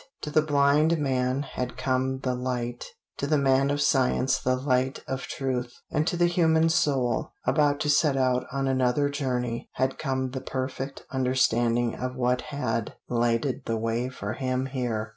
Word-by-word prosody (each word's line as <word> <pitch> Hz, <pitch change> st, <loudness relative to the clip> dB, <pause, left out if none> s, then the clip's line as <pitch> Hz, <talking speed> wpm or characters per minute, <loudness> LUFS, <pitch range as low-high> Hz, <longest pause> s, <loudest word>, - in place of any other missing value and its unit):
To 150 Hz, -, -5 dB
the 155 Hz, -, +4 dB
blind 150 Hz, +2 st, +3 dB
man 130 Hz, -1 st, 0 dB
had 125 Hz, -3 st, -5 dB
come 130 Hz, 0 st, 0 dB
the 130 Hz, -2 st, 0 dB
light; 125 Hz, -1 st, -3 dB, 0.3 s
to 140 Hz, -, -2 dB
the 155 Hz, +1 st, +3 dB
man 135 Hz, 0 st, +3 dB
of 145 Hz, 0 st, 0 dB
science 130 Hz, -1 st, +2 dB
the 130 Hz, 0 st, +1 dB
light 130 Hz, 0 st, 0 dB
of 130 Hz, 0 st, -4 dB
truth, 125 Hz, -2 st, -2 dB, 0.2 s
and 155 Hz, +2 st, 0 dB
to 175 Hz, -, 0 dB
the 175 Hz, -, +4 dB
human 165 Hz, -2 st, +3 dB
soul, 145 Hz, -3 st, +1 dB
about 145 Hz, -2 st, +2 dB
to 150 Hz, -, 0 dB
set 145 Hz, -2 st, +3 dB
out 130 Hz, -1 st, +1 dB
on 135 Hz, 0 st, -1 dB
another 130 Hz, +2 st, +2 dB
journey, 125 Hz, -4 st, -2 dB
had 130 Hz, 0 st, -1 dB
come 130 Hz, -3 st, -1 dB
the 130 Hz, 0 st, -4 dB
perfect 130 Hz, +1 st, -4 dB
understanding 120 Hz, -2 st, +2 dB
of 125 Hz, 0 st, -4 dB
what 125 Hz, 0 st, +1 dB
had 140 Hz, -6 st, -2 dB
lighted 120 Hz, +3 st, 0 dB
the 115 Hz, -, -1 dB
way 115 Hz, +3 st, -1 dB
for 100 Hz, -4 st, -5 dB
him 130 Hz, +1 st, -1 dB
here. 120 Hz, -5 st, -2 dB
130 Hz, 170 wpm, -26 LUFS, 125-140 Hz, 0.3 s, the